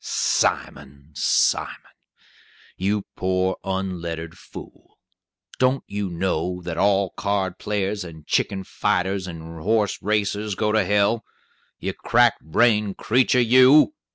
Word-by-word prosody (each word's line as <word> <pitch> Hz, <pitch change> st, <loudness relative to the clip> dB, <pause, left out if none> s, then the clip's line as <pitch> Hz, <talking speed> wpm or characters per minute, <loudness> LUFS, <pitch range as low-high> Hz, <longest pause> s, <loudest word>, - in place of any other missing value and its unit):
"Simon! 70 Hz, 0 st, -1 dB
Simon! -, -, 0 dB, 0.8 s
you 100 Hz, +2 st, -1 dB
poor 95 Hz, 0 st, 0 dB
unlettered 85 Hz, -4 st, -4 dB
fool. -, -, -13 dB, 0.6 s
Don't 130 Hz, +1 st, +2 dB
you 100 Hz, -1 st, -4 dB
know 90 Hz, 0 st, -2 dB
that 85 Hz, -1 st, -4 dB
all 100 Hz, -1 st, +2 dB
card 100 Hz, -3 st, -2 dB
players 105 Hz, -1 st, -2 dB
and 80 Hz, -3 st, -11 dB
chicken 95 Hz, +4 st, 0 dB
fighters 95 Hz, +1 st, -1 dB
and 80 Hz, -1 st, -9 dB
horse 105 Hz, +2 st, 0 dB
racers 105 Hz, 0 st, -1 dB
go 105 Hz, +1 st, 0 dB
to 110 Hz, -1 st, +2 dB
hell? 105 Hz, +4 st, +1 dB, 0.5 s
You -, -, -4 dB
crack -, -, +2 dB
brained 105 Hz, +4 st, +1 dB
creetur, 125 Hz, +2 st, +2 dB
you! 130 Hz, -, +6 dB
95 Hz, 115 wpm, -23 LUFS, 90-105 Hz, 0.8 s, you